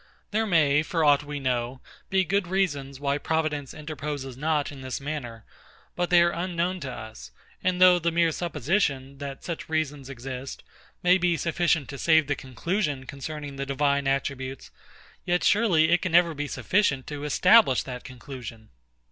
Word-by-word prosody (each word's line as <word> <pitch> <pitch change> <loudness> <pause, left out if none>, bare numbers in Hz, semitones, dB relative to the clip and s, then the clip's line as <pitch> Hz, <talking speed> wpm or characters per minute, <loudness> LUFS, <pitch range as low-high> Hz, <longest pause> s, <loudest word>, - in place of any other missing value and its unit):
There 220 +1 +1
may, 150 -5 +4
for 165 0 -1
aught 145 0 +5
we 145 0 -5
know, 125 -1 -2 0.3
be 190 0 +3
good 195 +1 0
reasons 145 -8 -1
why 140 0 0
Providence 155 -3 -1
interposes 145 -3 -6
not 150 +1 0
in 140 -2 -10
this 130 -1 -4
manner; 135 -6 -6 0.5
but 175 0 -1
they 175 -1 +6
are 170 - +2
unknown 175 +1 -2
to 140 -5 -5
us; 110 -2 -9 0.3
and 180 -1 +1
though 180 -1 +7
the 170 0 0
mere 165 0 +3
supposition, 150 - -1
that 140 -1 -7
such 170 -2 -5
reasons 150 -4 -2
exist, 130 0 -7 0.4
may 180 +1 +5
be 175 -1 +2
sufficient 170 -3 +1
to 140 - -7
save 160 0 +4
the 145 - 0
conclusion 145 - -2
concerning 145 +1 -7
the 140 - -3
Divine 140 0 +1
attributes, 135 -1 -3 0.5
yet 175 0 0
surely 180 -8 +4
it 175 - +4
can 185 - -3
never 170 -1 +5
be 145 0 -4
sufficient 145 -7 +1
to 145 -1 -6
establish 180 - +5
that 125 -2 -7
conclusion. 125 -3 -9
150 Hz, 165 wpm, -26 LUFS, 135-170 Hz, 0.5 s, though